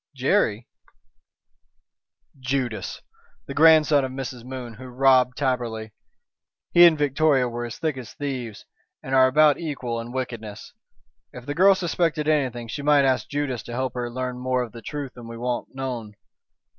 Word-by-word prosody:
"Jerry?" 125 Hz, -, +1 dB, 1.7 s
"Judas. 130 Hz, -3 st, -3 dB, 0.4 s
The -, -, -6 dB
grandson 155 Hz, -2 st, +5 dB
of 130 Hz, -, -3 dB
Mrs. 130 Hz, -2 st, -6 dB
Moon 125 Hz, -2 st, -7 dB
who 130 Hz, +4 st, -11 dB
robbed 125 Hz, 0 st, +3 dB
Taberley. 120 Hz, -5 st, -2 dB, 0.8 s
He 175 Hz, 0 st, +9 dB
and 160 Hz, -2 st, +3 dB
Victoria 145 Hz, -2 st, +2 dB
were 120 Hz, 0 st, -4 dB
as 120 Hz, -, -7 dB
thick 155 Hz, -4 st, -2 dB
as 120 Hz, -4 st, -8 dB
thieves, 130 Hz, -7 st, -5 dB, 0.4 s
and 130 Hz, -, -5 dB
are 130 Hz, -1 st, +6 dB
about 150 Hz, +2 st, +4 dB
equal 130 Hz, -8 st, -4 dB
in 115 Hz, +1 st, -7 dB
wickedness. 120 Hz, -5 st, -6 dB, 0.6 s
If 125 Hz, -1 st, -10 dB
the 145 Hz, -, -3 dB
girl 190 Hz, +5 st, +5 dB
suspected 165 Hz, -4 st, -1 dB
anything 130 Hz, -6 st, 0 dB
she 145 Hz, -, -5 dB
might 145 Hz, -1 st, +4 dB
ask 130 Hz, -1 st, 0 dB
Judas 140 Hz, -5 st, -2 dB
to 120 Hz, -, -9 dB
help 130 Hz, 0 st, -2 dB
her 125 Hz, -1 st, -3 dB
to -, -, -11 dB
learn 125 Hz, 0 st, -4 dB
more 130 Hz, 0 st, 0 dB
of 120 Hz, -, -8 dB
the 115 Hz, -, -10 dB
truth 145 Hz, +1 st, -6 dB
than 120 Hz, -2 st, -11 dB
we 115 Hz, 0 st, -8 dB
want 120 Hz, +2 st, -4 dB
known. 120 Hz, -6 st, -5 dB
130 Hz, 165 wpm, -24 LUFS, 120-145 Hz, 1.7 s, He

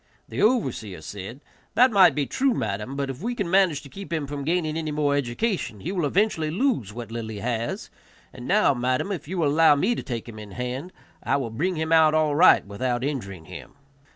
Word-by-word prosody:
The -, -, -4 dB
overseer 130 Hz, -, 0 dB
said, 100 Hz, -, -8 dB, 0.3 s
"That 250 Hz, +1 st, +6 dB
might 195 Hz, -4 st, +6 dB
be 145 Hz, -2 st, 0 dB
true, 265 Hz, -, +1 dB
madam, 105 Hz, +5 st, -3 dB
but 140 Hz, -1 st, -2 dB
if 135 Hz, -, -10 dB
we 240 Hz, +4 st, -2 dB
can 200 Hz, -7 st, -2 dB
manage 185 Hz, -6 st, +3 dB
to -, -, -11 dB
keep 195 Hz, 0 st, -9 dB
him 160 Hz, -3 st, -1 dB
from 140 Hz, 0 st, -5 dB
gaining 160 Hz, 0 st, 0 dB
any 160 Hz, -1 st, -2 dB
more 145 Hz, -1 st, +1 dB
education 140 Hz, -, -2 dB
he 175 Hz, -, -3 dB
will 175 Hz, -6 st, 0 dB
eventually 175 Hz, -3 st, +1 dB
lose 180 Hz, -, 0 dB
what 115 Hz, 0 st, -8 dB
little 115 Hz, -1 st, -5 dB
he 110 Hz, -, -6 dB
has; 115 Hz, +2 st, -3 dB, 0.4 s
and 125 Hz, -1 st, -9 dB
now, 200 Hz, -8 st, +4 dB
madam, 130 Hz, +9 st, -1 dB
if 175 Hz, -7 st, -5 dB
you 185 Hz, +3 st, -4 dB
will 160 Hz, -4 st, +2 dB
allow 155 Hz, +1 st, +5 dB
me 185 Hz, +12 st, +1 dB
to -, -, -4 dB
take 120 Hz, -4 st, -5 dB
him 110 Hz, -2 st, -9 dB
in 105 Hz, -2 st, -10 dB
hand, 125 Hz, +7 st, -4 dB, 0.3 s
I -, -, +1 dB
will 125 Hz, -5 st, -3 dB
bring 175 Hz, +11 st, -1 dB
him 160 Hz, 0 st, -2 dB
out 160 Hz, -1 st, +5 dB
all 155 Hz, -2 st, +2 dB
right 160 Hz, -, +6 dB
without 120 Hz, +5 st, -2 dB
injuring 100 Hz, -, -4 dB
him." -, -, -10 dB
145 Hz, 220 wpm, -25 LUFS, 120-175 Hz, 0.4 s, That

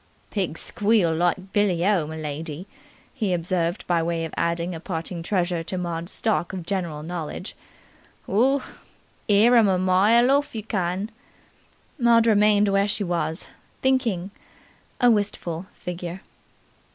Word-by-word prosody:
"Pigs 185 Hz, -6 st, -2 dB
squeal 205 Hz, -6 st, +2 dB
like 175 Hz, +3 st, 0 dB
billy 185 Hz, -4 st, +2 dB
o, 190 Hz, -7 st, +2 dB
m'lady!" 155 Hz, +1 st, -5 dB, 0.5 s
he 215 Hz, -8 st, -1 dB
observed 175 Hz, +1 st, -1 dB
by 170 Hz, -2 st, +1 dB
way 165 Hz, 0 st, -1 dB
of 160 Hz, -, -8 dB
adding 170 Hz, +1 st, -1 dB
a 165 Hz, -, -6 dB
parting 170 Hz, 0 st, -5 dB
treasure 175 Hz, -2 st, -1 dB
to 185 Hz, +3 st, -5 dB
Maud's 170 Hz, 0 st, -4 dB
stock 215 Hz, -6 st, -1 dB
of 180 Hz, -3 st, -5 dB
general 170 Hz, -6 st, -3 dB
knowledge. 175 Hz, +3 st, -5 dB, 0.7 s
"Oo! 255 Hz, +7 st, +2 dB, 0.7 s
'Ear 215 Hz, +4 st, +6 dB
'em 225 Hz, -3 st, +6 dB
a 190 Hz, -1 st, +2 dB
mile 205 Hz, +7 st, +4 dB
orf, 285 Hz, -2 st, +1 dB
you 220 Hz, -, -4 dB
can!" 195 Hz, 0 st, -2 dB, 0.9 s
Maud 235 Hz, -1 st, +5 dB
remained 210 Hz, -1 st, +4 dB
where 195 Hz, +1 st, +2 dB
she 205 Hz, 0 st, 0 dB
was, 170 Hz, -2 st, -2 dB, 0.4 s
thinking, 235 Hz, -9 st, +1 dB, 0.7 s
a 245 Hz, -1 st, +6 dB
wistful 190 Hz, -5 st, -2 dB
figure. 180 Hz, +1 st, -6 dB
185 Hz, 135 wpm, -24 LUFS, 170-210 Hz, 0.9 s, Ear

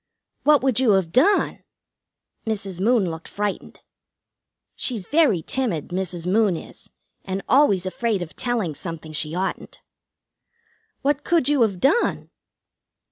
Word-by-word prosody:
"What 295 Hz, -3 st, +4 dB
would 260 Hz, -3 st, +3 dB
you 245 Hz, -5 st, +4 dB
have 190 Hz, -4 st, +1 dB
done?" 320 Hz, -, +2 dB, 0.8 s
Mrs. 200 Hz, -4 st, -3 dB
Moon 215 Hz, -5 st, +2 dB
looked 160 Hz, 0 st, -8 dB
frightened. 205 Hz, -1 st, -4 dB, 0.9 s
She's 225 Hz, -8 st, -3 dB
very 275 Hz, -, +3 dB
timid, 225 Hz, -, -2 dB
Mrs. 180 Hz, -2 st, -4 dB
Moon 195 Hz, -1 st, +2 dB
is, -, -, -11 dB, 0.3 s
and 190 Hz, 0 st, -4 dB
always 215 Hz, -9 st, +4 dB
afraid 205 Hz, 0 st, -1 dB
of 165 Hz, -, -11 dB
telling 235 Hz, -10 st, -1 dB
something 160 Hz, +1 st, -7 dB
she 155 Hz, +1 st, -2 dB
oughtn't. 190 Hz, +1 st, -4 dB, 1.2 s
"What 290 Hz, +1 st, +1 dB
could 335 Hz, -6 st, +2 dB
you 290 Hz, -3 st, +2 dB
have 200 Hz, -5 st, +2 dB
done?" 300 Hz, -, +1 dB
200 Hz, 130 wpm, -23 LUFS, 180-255 Hz, 1.2 s, What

